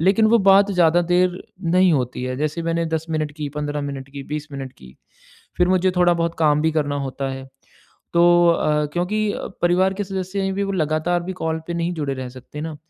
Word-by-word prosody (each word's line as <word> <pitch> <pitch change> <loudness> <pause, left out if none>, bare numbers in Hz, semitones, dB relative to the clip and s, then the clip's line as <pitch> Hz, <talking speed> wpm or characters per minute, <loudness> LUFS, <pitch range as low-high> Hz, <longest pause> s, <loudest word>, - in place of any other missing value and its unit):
लेकिन 195 +6 +4
वो 230 +2 +5
बात 200 +1 +5
ज़्यादा 175 -1 +4
देर 180 0 +2 0.3
नहीं 185 -2 +5
होती 125 -2 -2
है। 130 0 -3
जैसे 155 +3 -2
मैंने 165 0 -1
10 160 0 -2
मिनट 155 -2 -2
की, 150 -1 -5
15 145 0 -2
मिनट 140 -1 -6
की, 140 0 -7
20 150 0 -5
मिनट 135 -2 -6
की, 65 0 -16 0.6
फिर 180 0 +3
मुझे 185 0 +3
थोड़ा-बहुत 170 -1 +2
काम 150 -2 +3
भी 160 - +2
करना 145 -2 0
होता 135 +1 -4
है। 135 0 -6 0.7
तो 170 - +5 0.3
अ, 150 -2 +2
क्योंकि 205 +4 0 0.3
परिवार 185 +2 +3
के 205 +1 -3
सदस्य 190 0 -4
हैं 195 0 -1
भी 200 - -1
वो 195 - -3
लगातार 165 +1 0
भी 190 - -4
कॉल 160 0 -1
पे 170 - -2
नहीं 170 +1 -1
जुड़े 145 -4 -2
रह 130 -1 -6
सकते 130 +4 -10
ना 160 -1 -5
165 Hz, 210 wpm, -21 LUFS, 145-180 Hz, 0.7 s, वो